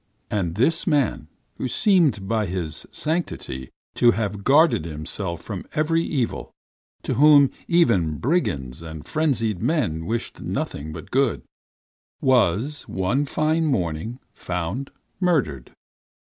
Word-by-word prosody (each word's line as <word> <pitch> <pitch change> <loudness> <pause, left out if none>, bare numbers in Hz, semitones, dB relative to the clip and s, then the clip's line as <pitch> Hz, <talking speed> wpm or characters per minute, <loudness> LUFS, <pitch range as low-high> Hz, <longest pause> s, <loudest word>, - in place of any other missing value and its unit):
"And 90 -5 -1
this 130 +10 +2
man 140 - +1 0.3
who - - -2
seemed 145 - +2
by 110 -1 0
his 85 -3 -3
sanctity 155 - -2 0.2
to 120 - +4
have 105 -3 -1
guarded 145 - +4
himself 85 +2 -4
from 100 -5 -5
every 165 +2 +2
evil, 130 -9 -2 0.5
to - - -1
whom 145 -1 +6 0.2
even 105 - +3
brigands 75 - -1
and 80 -2 -9
frenzied 115 - 0
men 80 - 0
wished 115 +1 -3
nothing 75 +2 -4
but 80 0 -9
good, 135 -2 +1 0.8
was 130 - +2
one 95 +10 0
fine 155 +3 +1
morning 90 - -1 0.2
found 90 +10 -4 0.3
murdered. 135 - 0
115 Hz, 115 wpm, -23 LUFS, -, 0.8 s, whom